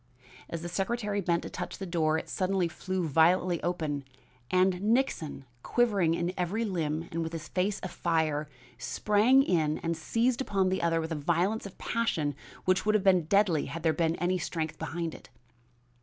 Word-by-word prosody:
As 170 0 -5
the - - -3
secretary 205 +3 -1
bent 170 -2 0
to - - -6
touch - - -5
the 195 - -5
door 160 -3 +1
it - - -5
suddenly 185 -1 0
flew 185 +1 -3
violently 170 +3 +3
open 155 -5 -2 0.5
and 185 0 +2
Nixon, 210 - 0 0.2
quivering 200 - +2
in 175 +1 -1
every 195 +6 -1
limb 165 -4 -2
and 165 - -2
with 165 0 -4
his 165 -1 -5
face 195 +2 -1
afire, 160 -4 0 0.3
sprang 210 - +3
in 160 - +1
and 165 0 0
seized 230 +10 0
upon 195 -7 +1
the 190 - -1
other 165 -1 +2
with 160 +1 -5
a - - 0
violence 175 +8 0
of 195 - -14
passion 165 -11 -1 0.3
which 185 0 +2
would 215 0 +2
have 210 - +2
been 185 -4 +4
deadly 185 -3 +3
had 165 +4 -6
there 160 -1 +3
been 165 -1 +1
any 180 +2 0
strength 160 -3 -3
behind 160 +1 -3
it. - - -13
175 Hz, 180 wpm, -29 LUFS, 160-195 Hz, 0.5 s, been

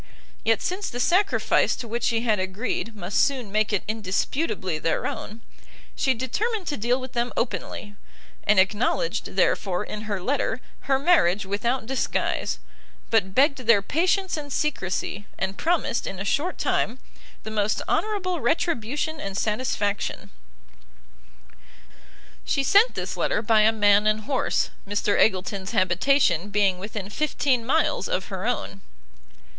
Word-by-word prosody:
Yet 225 -1 +2
since 380 +3 -2
the 245 - -5
sacrifice 370 +10 +2
to 240 - -7
which 235 +1 -2
she 230 -1 +1
had 220 -4 +1
agreed 210 +4 -3
must 190 -1 +1
soon 255 -7 -1
make 215 +1 +1
it 205 - 0
indisputably 205 - -1
their 165 - -1
own, 220 +2 -5 0.5
she 265 -2 +1
determined 390 - -2
to 290 - -1
deal 240 +3 +1
with 260 -1 -8
them 240 0 -1
openly; 205 0 -3 0.5
and 210 -2 +4
acknowledged, 220 - 0
therefore, 190 0 +1
in 210 0 -6
her 200 -2 -1
letter, 260 +11 -1 0.3
her 270 - +4
marriage 240 - +3
without 220 +6 -1
disguise, 265 +2 -1 0.5
but 190 -4 +2
begged 280 +1 +4
their 230 -5 +4
patience 360 - +1
and 290 -2 -6
secresy, 205 -7 -2
and 190 +1 -3
promised, 330 -7 0
in 195 - -5
a 195 - -4
short 310 - 0
time, 240 - 0 0.5
the 220 - -6
most 210 -1 0
honourable 370 -5 0
retribution 300 +1 -1
and 195 -5 -4
satisfaction. 210 -2 -1 2.1
She 275 - 0
sent 405 - +5
this - - -3
letter 210 - 0
by 220 -1 +4
a 215 +1 +5
man 205 -1 +4
and 215 0 +2
horse, 260 +4 0 0.2
Mr 205 0 0
Eggleston's 190 0 +1
habitation 185 - +2
being 200 -3 +2
within 205 0 -6
fifteen 275 -3 0
miles 300 - +1
of 185 - -2
her 190 +2 -3
own. 195 -5 -3
225 Hz, 140 wpm, -25 LUFS, 200-275 Hz, 2.1 s, sent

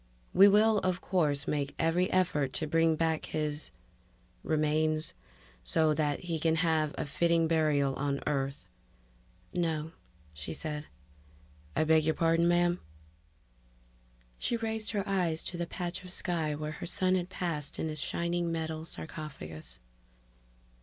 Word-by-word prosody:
"We 195 - +9
will, 210 +1 +5
of 185 -1 0
course, 150 -7 0
make 145 -1 -1
every 170 +3 +2
effort 150 -8 +1
to 155 - -1
bring 165 +1 +3
back 160 0 0
his... 150 -1 -2 0.7
remains... 155 0 +1 0.5
so 155 - +2
that 150 -1 0
he 170 -3 -2
can 160 +1 +2
have 160 -2 +1
a - - -2
fitting 165 +3 +2
burial 150 -4 +2
on 140 +1 -1
Earth." 135 -1 -1 0.9
"No," 160 -2 -1 0.4
she 75 +1 -5
said. 150 - -4 0.9
"I - - +3
beg 160 0 +4
your 160 +1 +1
pardon, 165 +1 +3
ma'am?" 175 0 +3 1.6
She 235 - 0
raised 220 -1 -2
her 205 -3 -2
eyes 175 -5 +1
to - - -5
the 170 0 -2
patch 175 +1 -4
of 180 - -9
sky 165 -5 0
where 150 +1 -4
her 155 +3 -6
son 185 +1 +1
had 180 -1 0
passed 165 -5 -2
in - - -1
his 155 -1 -4
shining 170 0 -1
metal 160 -1 -3
sarcophagus. 80 - -7
160 Hz, 140 wpm, -31 LUFS, 150-175 Hz, 1.6 s, We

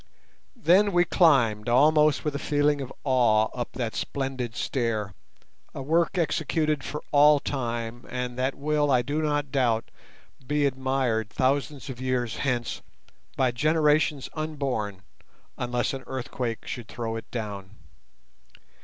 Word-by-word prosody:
Then 200 -2 +4
we 175 0 +4
climbed 120 - +3
almost 150 +4 +4
with 150 - 0
a 140 - -3
feeling 145 -1 +1
of 135 - -6
awe 120 -5 +3
up 120 -1 -5
that 120 -2 -3
splendid 130 -4 -3
stair, 110 -8 -2 0.6
a 135 - -5
work 165 +5 +1
executed 155 -2 0
for 150 - -5
all 145 0 +6
time 120 -4 -4
and 125 -1 -3
that 130 +2 -1
will, 150 0 0
I 125 -2 +3
do 145 +5 -1
not 145 -2 -1
doubt, 120 -5 +1 0.6
be 150 0 +1
admired 130 -5 0
thousands 140 +3 -1
of 130 -2 -7
years 125 -3 -1
hence 125 -4 -2 0.6
by 130 -2 +3
generations 150 0 +2
unborn 135 -11 -3 0.5
unless 125 +1 -1
an 135 -1 -6
earthquake 125 -2 -4
should 120 -4 -6
throw 115 +1 -4
it 115 - -7
down. 105 -3 -6
130 Hz, 135 wpm, -26 LUFS, 120-150 Hz, 0.6 s, all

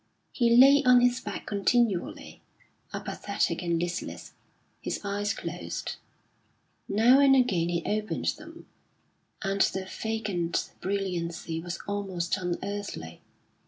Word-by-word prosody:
He 235 -2 +3
lay 275 +3 +8
on 250 -1 +6
his 245 +1 +3
back - - -6
continually, 205 -1 0 0.5
apathetic 200 -4 -2
and 170 -2 0
listless, 175 +1 -4 0.5
his - - -3
eyes 205 0 -1
closed. - - -5 0.9
Now 235 +6 +5
and 275 -1 +6
again 185 -10 +2
he 170 -1 -1
opened 215 0 -2
them, - - -12 0.8
and 195 0 0
their 190 0 +1
vacant 200 -5 -2
brilliancy 175 -4 -2
was 175 +1 -5
almost 190 -4 -2
unearthly. 180 - -5
200 Hz, 110 wpm, -28 LUFS, 175-225 Hz, 0.9 s, lay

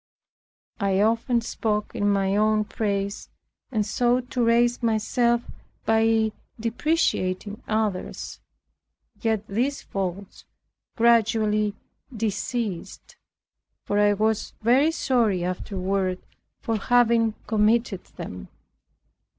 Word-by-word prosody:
I 195 -2 +1
often 230 +3 +2
spoke 215 -2 -2
in 205 - +1
my 195 -1 +1
own 215 0 +3
praise, 200 -1 -3 0.4
and 215 -4 0
sought 245 +4 0
to 245 - +1
raise 240 +1 +3
myself 235 +1 +1 0.4
by 225 0 +3 0.3
depreciating 220 - -1
others. 215 -4 -2 0.8
Yet 220 -3 0
these 255 +8 -1
faults 195 0 -5 0.5
gradually 220 -3 +3 0.4
deceased; 215 -3 -4 0.7
for 205 - 0
I 205 0 +4
was 215 +1 0
very 260 +7 +4
sorry 235 - +1
afterward 185 +1 -2 0.4
for 225 -1 -1
having 230 0 +3
committed 215 -2 +1
them. 90 0 -8
220 Hz, 95 wpm, -25 LUFS, 200-235 Hz, 0.8 s, I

